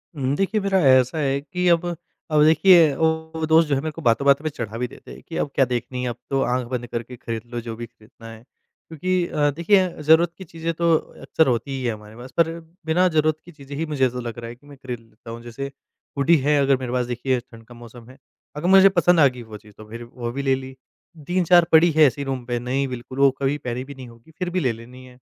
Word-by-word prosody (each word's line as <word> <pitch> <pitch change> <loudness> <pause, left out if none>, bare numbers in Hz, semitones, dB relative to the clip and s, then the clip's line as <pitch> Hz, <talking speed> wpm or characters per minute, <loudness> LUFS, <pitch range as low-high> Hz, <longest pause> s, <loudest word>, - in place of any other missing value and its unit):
हुँ, 135 -1 -1
देखिए 195 +5 0
मेरा 195 -1 +1
ऐसा 130 +3 +4
है 140 -2 0
कि 180 +4 -3
अब 170 0 +3 0.5
अब 150 -1 +4
देखिए 160 -1 +6
वो 160 +1 -1
दोस्त 160 +1 +4
जो 145 - +1
हैं 135 - -1
मेरे 155 - -3
को 165 - -10
बातों-बातों 140 +3 +3
पे 155 - -1
चढ़ा 115 -6 -6
भी 125 +1 -2
देते - - -14
हैं - - -11
कि 165 - -6
अब - - -1
क्या 135 - +4
देखनी 125 0 -4
है, 125 - -1
अब 120 - -5
तो 135 -1 0
आँख 125 0 -1
बंद 120 -1 -4
करके 120 +2 -6
ख़रीद 115 -1 -5
लो 120 - -3
जो 115 -1 -7
भी 120 +1 -7
ख़रीदना 115 0 -16
है। 115 +1 -13 0.5
क्योंकि 180 +3 -1
अ, 145 -3 +1
देखिए 185 +5 +3 0.2
ज़रूरत 160 +2 +4
की 190 - -9
चीज़ें 165 0 -5
तो 170 0 +2 0.3
अक्सर 160 - +1
होती 125 +2 -1
ही 135 -1 -4
हैं 115 - 0
हमारे 105 0 -13
पास 125 +2 -11
पर 165 -1 +4 0.4
बिना 175 +3 +3
ज़रूरत 155 0 +3
की 175 - -13
चीज़ें 140 -3 -11
ही 165 - -1
मुझे 145 -4 0
ऐसा 125 0 -6
लग 120 -1 -6
रहा 115 0 -7
है 120 - -9
कि 145 +4 -23
मैं 145 -1 -13
ख़रीद 125 -3 -6
लेता 115 0 -14
हूँ। 115 - -8
जैसे 135 +4 -6 0.5
हुडी 140 +5 +4
है 150 0 +3
अगर 135 -1 +3
मेरे 125 -2 -5
पास 125 -1 0
देखिए 125 +1 -1
ठंड 115 -2 -16
का 120 - -13
मौसम 120 0 -13
है। 130 - -15 0.4
अगर 150 +4 -3
मुझे 195 +1 +7
पसंद 175 -2 +3
आ 145 - +7
गई 125 -2 -6
वो 105 - -8
चीज़ 105 0 -19
तो 110 0 -13
फिर 115 +2 -8
वो 120 0 -6
भी 140 - -4
ले 135 -1 +2
ली। 130 0 -9 0.5
3-4 175 -1 +4
पड़ी 160 +2 +6
है 155 0 +4
ऐसे 140 +1 0
ही - - -4
रूम 130 -2 -4
पे, 120 0 -2
नहीं 130 +3 -1
बिल्कुल 125 +1 -7
वो 140 0 +6
कभी 140 +2 0
पहनी 125 -2 -5
भी 140 +1 -11
नहीं 130 -1 -10
होगी, 115 +6 -17
फिर 180 -1 -2
भी 185 +1 -1
ले 130 -8 +1
लेनी 120 +3 -12
है। 125 -1 -16
135 Hz, 260 wpm, -22 LUFS, 120-160 Hz, 0.5 s, मुझे